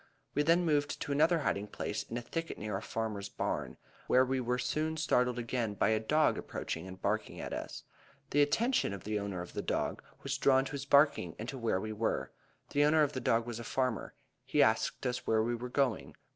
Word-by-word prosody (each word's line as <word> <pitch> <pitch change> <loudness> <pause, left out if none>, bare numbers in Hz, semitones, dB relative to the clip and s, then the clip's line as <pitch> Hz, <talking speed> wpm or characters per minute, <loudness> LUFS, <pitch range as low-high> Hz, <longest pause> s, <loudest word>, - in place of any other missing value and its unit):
We 145 - +2
then 170 +4 +3
moved 145 -2 +1
to - - -5
another 160 +4 +4
hiding 105 -6 -1
place 105 +1 -3
in 115 - -6
a 120 - -4
thicket 165 +6 -4
near 105 -1 -3
a 100 - -2
farmer's 110 -3 -3
barn, - - -3 0.3
where 130 +1 +5
we 130 0 0
were 125 0 0
soon 155 +5 -1
startled 125 -5 +2
again 115 -3 -2
by - - +2
a 110 0 +3
dog 150 +8 +2
approaching 80 +3 -5
and 95 0 -9
barking 105 +3 -1
at - - -5
us. - - -5 0.5
The 145 - +4
attention 225 - +2
of 100 - -7
the 105 0 -1
owner 100 -3 -3
of 90 - -12
the - - -2
dog - - -1 0.2
was - - -2
drawn 135 -1 +4
to - - -6
his 140 -1 -4
barking 140 - +4
and 110 - -6
to 135 - -5
where 115 -5 +1
we 110 +2 -4
were. 110 +1 -1 0.4
The 145 - +3
owner 155 +1 +5
of 145 - 0
the 130 - -3
dog 115 -1 +2
was 120 -1 -5
a - - -5
farmer. 125 -1 -1 0.3
He - - +3
asked - - +1
us 125 -1 -2
where 110 -1 +3
we 120 +2 0
were 120 +1 -4
going. 130 -2 0
125 Hz, 225 wpm, -32 LUFS, 110-145 Hz, 0.5 s, where